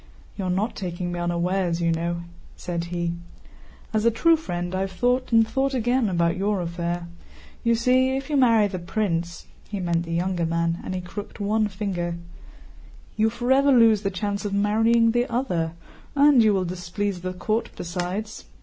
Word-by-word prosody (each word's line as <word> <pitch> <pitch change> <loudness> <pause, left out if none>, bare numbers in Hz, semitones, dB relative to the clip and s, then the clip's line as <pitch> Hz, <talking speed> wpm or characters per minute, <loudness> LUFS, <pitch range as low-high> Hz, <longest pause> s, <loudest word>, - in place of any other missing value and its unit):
"You 195 - -4
are - - -1
not 195 +6 -1
taking 175 -2 -4
me 175 - -4
unawares, 175 0 0
you 170 -1 +1
know," 170 +1 -2 0.3
said 170 -1 -4
he. 170 0 -2 0.8
"As 215 -1 +1
a 235 - +5
true 330 +9 +4
friend, 175 - -4
I 185 - -1
have 190 0 -2
thought 245 +7 0
and 225 -1 +5
thought 270 +4 0
again 245 -1 +1
about 170 -2 +1
your 200 +1 0
affair. 170 0 -3 0.6
You 235 -1 +3
see, 255 +3 +3
if 270 - -5
you 300 - -1
marry 230 -5 +5
the 190 -2 -3
prince"—he 175 +1 -4
meant 170 -2 0
the 165 -1 -6
younger 175 0 0
man—and 170 +2 -1
he 180 - -3
crooked 200 +3 -8
one 215 +1 +1
finger, 185 -4 -3 1.0
"you 220 +1 +3
forever 265 +4 +2
lose 225 -5 +5
the 195 - 0
chance 200 +2 -3
of 200 -1 -2
marrying 225 +3 +3
the 240 +2 +1
other, 180 -10 -1 0.4
and 285 -3 +6
you 215 -1 +5
will 190 -2 +1
displease 180 +2 -3
the 185 0 -4
court 215 +5 -1
besides. 180 +5 -4
195 Hz, 175 wpm, -24 LUFS, 175-230 Hz, 1.0 s, and